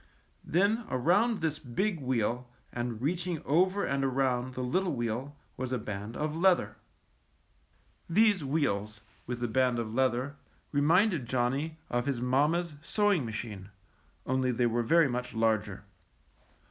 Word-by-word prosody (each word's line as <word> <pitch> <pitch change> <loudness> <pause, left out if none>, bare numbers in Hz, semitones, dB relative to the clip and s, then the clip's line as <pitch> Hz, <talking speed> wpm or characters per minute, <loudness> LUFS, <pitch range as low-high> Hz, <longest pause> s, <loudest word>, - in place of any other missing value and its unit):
Then 205 +7 +1
around 175 - +2
this 155 -2 -1
big 170 - -1
wheel 125 -1 -1 0.2
and 120 -1 -4
reaching 175 +2 -1
over 185 +7 +2
and 140 0 0
around 130 -1 0
the 125 - -3
little 175 +6 0
wheel 120 +4 -3 0.2
was 130 0 -4
a 130 - +1
band 105 0 -6
of 150 0 -2
leather. 180 +1 +2 1.3
These 205 -1 +4
wheels, 110 -8 -1 0.3
with 120 0 -4
the 120 - 0
band 125 +1 +2
of 110 -2 -3
leather, 130 +2 0 0.3
re 145 - +1
minded 165 - +3
Johnny 130 +6 -1
of 120 +1 -1
his 135 -4 0
mamma's 150 +7 +1
sewing 200 - +1
ma 115 - -4
chine, 105 -4 -6 0.6
only 130 0 +1
they 125 0 +1
were 120 0 +1
very 165 +7 +4
much 125 -1 -4
larger. 110 -3 0
130 Hz, 145 wpm, -30 LUFS, 120-165 Hz, 1.3 s, These